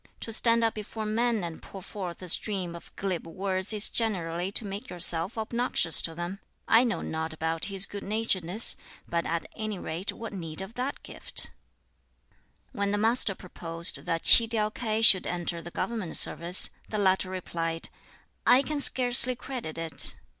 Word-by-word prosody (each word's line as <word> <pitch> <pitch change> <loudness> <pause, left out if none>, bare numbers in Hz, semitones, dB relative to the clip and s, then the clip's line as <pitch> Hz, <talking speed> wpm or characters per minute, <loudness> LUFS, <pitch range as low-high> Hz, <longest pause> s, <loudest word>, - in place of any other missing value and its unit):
To 225 - -4
stand 230 +1 +3
up 225 - +1
before 215 +1 -7
men 225 -1 -1
and 170 -2 -7
pour 195 - -11
forth 185 -2 -7
a - - -7
stream 185 -2 +2
of 170 - -13
glib 185 -4 -4
words 190 +2 -2
is 210 -1 +2
generally 180 -5 -2
to 225 - +2
make 200 +1 -7
yourself 175 +3 +1
obnoxious 230 -6 +3
to 165 - -2
them. 175 +3 -6 0.3
I 230 +2 +5
know 235 -2 -2
not 160 0 -4
about 160 +1 -3
his 195 -1 +3
good 200 0 -8
naturedness; 205 -2 0 0.3
but 170 0 -2
at 165 0 -3
any 215 -3 -5
rate 175 +3 -5
what 225 -2 -9
need 165 -5 -6
of 190 +3 -7
that 255 +4 -5
gift?" - - -2 1.2
When 200 0 -2
the 205 - 0
Master 220 -1 +2
proposed 170 -2 -2
that 165 -1 -2
Tsi 230 - +9
tiau 215 -1 -1
K'ai 220 -2 -2
should 190 -4 +6
enter 175 -1 -4
the 175 - -9
government 210 -2 -2
service, 175 +3 +4 0.2
the 215 - -3
latter 190 -2 +1
replied, 165 -3 -4 0.5
"I 260 +2 +4
can 300 +1 -3
scarcely 250 -2 +5
credit 245 - -7
it." 165 -1 0
195 Hz, 170 wpm, -27 LUFS, 170-225 Hz, 1.2 s, Tsi